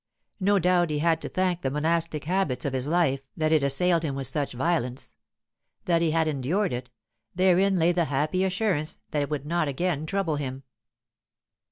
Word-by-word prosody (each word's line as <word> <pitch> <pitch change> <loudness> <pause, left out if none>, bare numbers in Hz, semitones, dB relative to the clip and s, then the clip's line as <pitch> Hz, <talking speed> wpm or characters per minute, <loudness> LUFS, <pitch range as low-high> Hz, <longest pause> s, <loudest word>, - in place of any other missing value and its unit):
No 200 +1 +3
doubt 180 -1 +2
he 150 - -1
had 160 +1 +1
to - - -4
thank 185 -2 0
the 135 - -1
monastic 160 +1 -1
habits 165 -8 -1
of 140 - -1
his 130 +1 -2
life 155 -5 +2 0.2
that 155 0 +1
it 155 -2 +4
assailed 165 +5 +2
him 145 -4 -3
with 135 -1 -4
such 145 +1 -2
violence. 130 -2 -2 0.7
That 170 -2 +2
he 165 - +2
had 160 0 +1
endured 155 +7 0
it, 125 0 -5 0.5
therein 190 +1 +3
lay 170 -1 +3
the 175 -1 +1
happy 155 +6 0
assurance 185 -5 -1
that 150 - 0
it 145 - -2
would 145 -2 -3
not 165 0 0
again 155 +2 -1
trouble 190 -6 -1
him. 135 -1 -5
160 Hz, 185 wpm, -26 LUFS, 140-180 Hz, 0.7 s, it